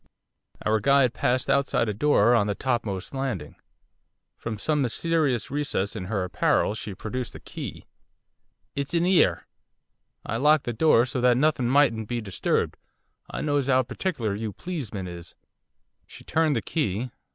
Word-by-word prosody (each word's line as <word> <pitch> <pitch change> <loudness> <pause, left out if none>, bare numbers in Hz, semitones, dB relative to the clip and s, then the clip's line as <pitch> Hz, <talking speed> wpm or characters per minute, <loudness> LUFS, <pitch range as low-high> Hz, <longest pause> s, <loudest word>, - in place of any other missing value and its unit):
Our 110 0 +3
guide 135 0 +4
paused 125 +1 0
outside 140 -4 +2
a 105 - -1
door 120 -1 +4
on 110 -4 +3
the 100 - -1
topmost 115 -7 -2
landing. 135 - -3 0.8
From 115 -2 -5
some 150 +6 0
mysterious 135 -2 0
recess 140 -9 -1
in 90 - -4
her 100 -1 -1
apparel 90 +2 +1
she 105 -2 -6
produced 125 +5 -5
a - - -8
key. - - -8 0.9
'It's 140 +4 -2
in 170 +1 +2
'ere. 185 -1 +3 0.8
I 115 - -2
locked 150 +3 +4
the 120 - -3
door 120 -2 +4
so 130 0 -3
that 125 -1 +4
nothing 135 -4 +2
mightn't 125 -6 +3
be 120 +1 -2
disturbed. 100 -5 -1 0.5
I - - -4
knows 145 -2 0
'ow 130 -1 +4
particular 125 - -2
you 105 0 -4
pleesmen 115 - -5
is.' 85 -1 -9 0.7
She - - -13
turned 160 -2 +1
the 115 - -1
key. 120 - -2
125 Hz, 155 wpm, -26 LUFS, 110-145 Hz, 0.9 s, guide